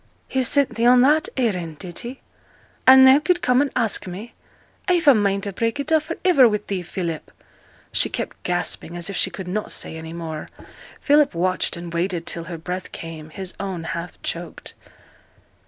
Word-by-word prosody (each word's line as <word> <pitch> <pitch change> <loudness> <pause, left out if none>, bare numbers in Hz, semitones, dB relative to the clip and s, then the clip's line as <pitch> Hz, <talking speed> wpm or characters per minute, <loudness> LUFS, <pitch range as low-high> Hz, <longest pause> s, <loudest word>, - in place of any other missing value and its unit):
'He 265 - 0
sent 280 +2 +2
thee 230 - 0
on 250 0 +7
that 300 +4 +4
errand, 180 - -1
did 175 +1 -7
he? 250 +2 -8 0.7
And 265 0 +10
thou 265 +2 +8
could 355 +3 +1
come 250 +1 +4
and 285 - +1
ask 225 -5 0
me? 195 +6 -8 0.5
I've 350 -4 +2
a 280 - +10
mind 200 -3 +1
to 200 - -3
break 230 +7 -1
it 285 +3 -3
off 315 -1 +3
for 330 - -5
iver 275 -10 +6
wi' 210 -1 0
thee, 195 -2 -2
Philip.' 170 -2 -4 0.6
She - - +2
kept - - -5
gasping, 175 -1 -2
as 175 +3 -4
if - - -6
she - - +1
could 190 -2 -8
not 210 +4 -3
say - - -4
any 160 0 -7
more. 160 -2 -6 0.5
Philip 295 - +4
watched 185 +1 0
and 170 0 -7
waited 170 0 -1
till 170 -1 -4
her 170 0 -6
breath 180 +3 -5
came, 160 -2 -8
his 185 +3 -7
own 190 -4 -4
half 170 +1 -5
choked. 170 0 -5
195 Hz, 190 wpm, -22 LUFS, 170-260 Hz, 0.7 s, And